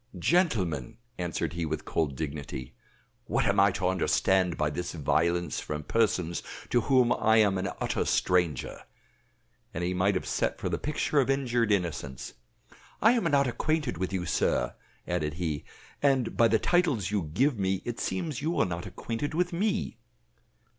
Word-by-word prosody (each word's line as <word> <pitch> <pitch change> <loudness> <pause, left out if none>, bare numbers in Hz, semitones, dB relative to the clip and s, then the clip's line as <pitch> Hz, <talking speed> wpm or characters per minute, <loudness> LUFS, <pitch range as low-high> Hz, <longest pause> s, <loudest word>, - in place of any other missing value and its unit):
"Gentlemen," 95 - +1 0.2
answered 85 -1 -2
he 85 0 -3
with 80 -1 -3
cold 75 -5 -1
dignity, 70 -4 -5 0.5
"what - - 0
am - - +2
I 100 +1 +6
to 90 -1 -1
understand 95 0 +2
by 75 -1 0
this 90 +4 -4
violence 85 +2 0
from 75 0 -4
persons 90 -5 0 0.3
to 120 - +4
whom 130 -1 +3
I 110 +1 +3
am 100 -3 +4
an 95 - -2
utter - - 0
stranger?" 90 -7 +1 0.9
and 85 - -2
he 90 +1 0
might 95 +2 +2
have 95 - -2
set - - -1
for - - -3
the - - -2
picture 150 0 0
of 135 - +2
injured 120 -5 +1
innocence. 75 -9 -2 0.7
"I 225 - +6
am 235 -5 +1
not 140 -3 +3
acquainted 140 - -1
with 95 0 -2
you, 95 -2 -2
sir," - - +1 0.3
added 75 0 -1
he; 80 -5 -3 0.4
"and 135 -4 +2
by 115 - +5
the 110 0 +3
titles 140 - +1
you 105 -2 +1
give 130 - +2
me 95 -1 0
it 120 -1 -4
seems 160 -9 -2
you 165 +4 -1
are - - +4
not 85 0 -4
acquainted 115 +10 -4
with 180 +1 0
me." 200 - -1
95 Hz, 165 wpm, -28 LUFS, 85-135 Hz, 0.9 s, I